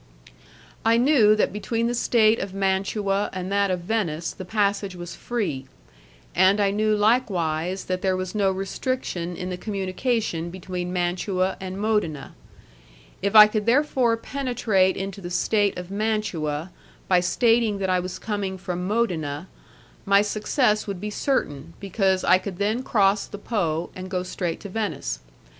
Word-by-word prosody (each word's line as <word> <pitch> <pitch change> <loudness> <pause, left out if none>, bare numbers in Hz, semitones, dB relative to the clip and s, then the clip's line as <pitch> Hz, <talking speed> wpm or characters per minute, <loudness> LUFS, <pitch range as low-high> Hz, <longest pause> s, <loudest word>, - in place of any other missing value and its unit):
I 230 +1 +4
knew 240 -5 +5
that 215 - +1
between 225 +3 -1
the 240 - 0
state 230 -2 +3
of 195 0 -5
Mantua 195 +1 0
and 185 0 -4
that 200 0 +2
of 180 -1 -1
Venice 170 -5 -1
the - - -8
passage 200 0 0
was 175 -1 -7
free, 190 - -3 0.7
and 190 +3 +4
I 200 -1 +3
knew 215 +1 +2
likewise 190 -6 +1
that 185 0 -2
there 190 -1 +1
was 185 -1 -4
no 200 -3 +2
restriction 190 -2 -3
in 180 +1 -5
the 180 - -3
communication 195 -2 -2
between 180 0 -5
Mantua 185 +1 0
and 190 0 -5
Modena; 210 -10 -1 0.9
if 200 +2 -1
I 210 0 +12
could 215 0 -2
therefore 250 -3 +3
penetrate 230 -7 0
into 195 0 -5
the 175 - -6
state 200 +3 +1
of 180 +1 -7
Mantua 190 -7 -2 0.4
by 180 -1 +4
stating 225 +3 +2
that 190 -1 -2
I 185 - +3
was 180 0 -5
coming 200 -3 -3
from 180 0 -4
Modena, 175 -8 -1 0.5
my 200 +1 +4
success 215 +1 +1
would 195 -3 -4
be 210 +2 -4
certain, 165 - -2
because 190 -1 0
I 185 - +5
could 185 -1 -6
then 210 +5 0
cross 200 -5 +2
the 205 - -8
Po 175 -7 -2
and 185 0 -7
go 180 -1 -1
straight 180 -2 -3
to 200 - -7
Venice. 200 - -3
195 Hz, 155 wpm, -24 LUFS, 180-215 Hz, 0.9 s, I